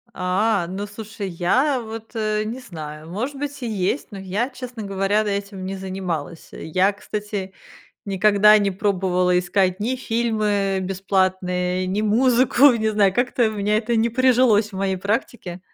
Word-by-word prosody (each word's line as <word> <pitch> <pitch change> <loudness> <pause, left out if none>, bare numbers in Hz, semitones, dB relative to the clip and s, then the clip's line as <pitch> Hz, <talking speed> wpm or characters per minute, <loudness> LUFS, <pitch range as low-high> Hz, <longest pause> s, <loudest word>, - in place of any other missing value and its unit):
А, 185 +1 +1
ну, 195 +3 -4
слушай, 210 0 -7
я 245 - +1
вот, 225 0 -8
э, 215 -1 0
не 235 +4 -5
знаю, 155 -7 -9
может 245 +10 -4
быть, 285 0 -5
и 240 - -3
есть, 200 +5 -1
но 200 - -7
я, 195 +6 -2
честно 250 -3 -8
говоря, 195 +2 0
д 210 - -2
этим 200 -2 -6
не 195 - -4
занималась. 185 -4 -5
Я, 185 +5 +1
кстати, 205 -1 -5 0.5
никогда 210 +2 +5
не 200 -1 +1
пробовала 185 -2 +1
искать 185 +1 0
ни 235 +5 0
фильмы 215 -5 0
бесплатные, 185 -1 0
ни 190 +3 -1
музыку. 250 +4 +4
Не 220 -2 0
знаю, 205 -3 +3
как-то 245 0 +1
у - - -5
меня 210 0 0
это 230 +1 0
не 225 +1 +2
прижилось 235 -3 +3
в 190 - -7
моей 190 -1 -1
практике. 195 -2 -3
205 Hz, 160 wpm, -22 LUFS, 185-225 Hz, 0.5 s, никогда